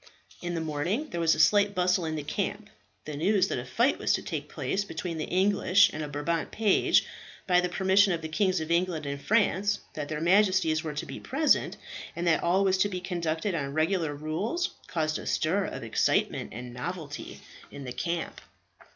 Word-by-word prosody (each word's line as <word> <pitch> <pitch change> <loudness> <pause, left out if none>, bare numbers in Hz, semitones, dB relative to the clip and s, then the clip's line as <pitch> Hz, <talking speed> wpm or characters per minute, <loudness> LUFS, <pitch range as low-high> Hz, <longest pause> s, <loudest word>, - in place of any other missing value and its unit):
In 175 -1 -3
the 165 - -1
morning 165 - -2
there 170 - -2
was 165 -1 +4
a - - -6
slight 205 +5 +4
bustle 180 -1 +2
in 160 0 -2
the 150 - -4
camp. - - -3 0.3
The 150 - -5
news 190 +6 +2
that - - -1
a 120 - -6
fight 240 - +2
was - - +1
to - - -1
take - - -5
place 200 - -2
between 165 -3 -5
an - - -3
English 200 +1 +4
and 155 - -4
a 150 - -3
Brabant 150 +3 -2
page, 215 -3 +3 0.4
by 180 -1 +4
the 180 - -1
permission 190 +2 +3
of 165 -2 -2
the - - -3
Kings 185 +3 +1
of 160 +1 -4
England 170 -3 +1
and 140 0 -4
France, 205 0 +2
that 145 -2 -5
their 155 -1 -3
Majesties 180 -2 +3
were 155 -2 -4
to 150 - -3
be 135 - -7
present, 300 +3 +1 0.4
and 170 - -3
that 170 - +3
all 185 +3 +2
was 190 -1 +2
to 205 - +3
be 185 -2 -4
conducted 175 +1 -2
on 140 -3 -3
regular 160 -1 +1
rules, 180 - -2 0.2
caused 155 -2 -1
a - - -8
stir 190 +5 +1
of - - -6
excitement - - 0
and 120 +2 -8
novelty 145 +3 -6 0.3
in 140 - -9
the 125 -2 -6
camp. 170 +4 -3
170 Hz, 205 wpm, -28 LUFS, 155-195 Hz, 0.4 s, was